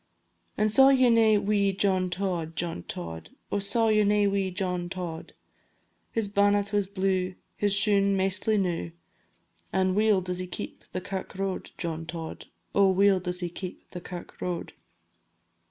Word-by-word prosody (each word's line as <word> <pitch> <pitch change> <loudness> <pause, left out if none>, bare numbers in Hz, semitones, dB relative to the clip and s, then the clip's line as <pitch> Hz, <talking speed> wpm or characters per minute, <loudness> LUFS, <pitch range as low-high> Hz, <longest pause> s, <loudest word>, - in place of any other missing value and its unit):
An' 215 0 +2
saw 265 +5 +7
ye 260 -3 +5
nae 220 -2 +5
wee 200 -1 +2
John 190 -1 +1
Tod, 175 -3 -2
John 165 - -2
Tod? 80 -2 -6 0.2
Oh, 205 - +1
saw 225 +3 +3
ye 215 -1 +4
nae 205 0 +3
wee 200 -1 +1
John 180 -1 -2
Tod? 175 -3 -6 0.8
His 225 -2 0
bannet 205 0 +2
was 205 -2 +2
blue, 185 -1 -1 0.2
His 205 -1 +2
shoon 200 -1 +3
maistly 195 +3 +1
new, 170 -3 -2 0.8
An' 185 -1 +1
weel 210 -1 +3
does 180 0 -4
he 185 - -4
keep - - -7
the 185 - -3
kirk 190 0 -6
road, 195 0 -3
John 165 -1 -4
Tod, 165 -2 -7 0.3
Oh, 200 -1 +5
weel 195 0 +4
does 180 0 -3
he 175 - -2
keep 180 +1 -8
the 180 - -7
kirk 175 0 -9
road. 180 -1 -4
190 Hz, 160 wpm, -27 LUFS, 180-205 Hz, 0.8 s, saw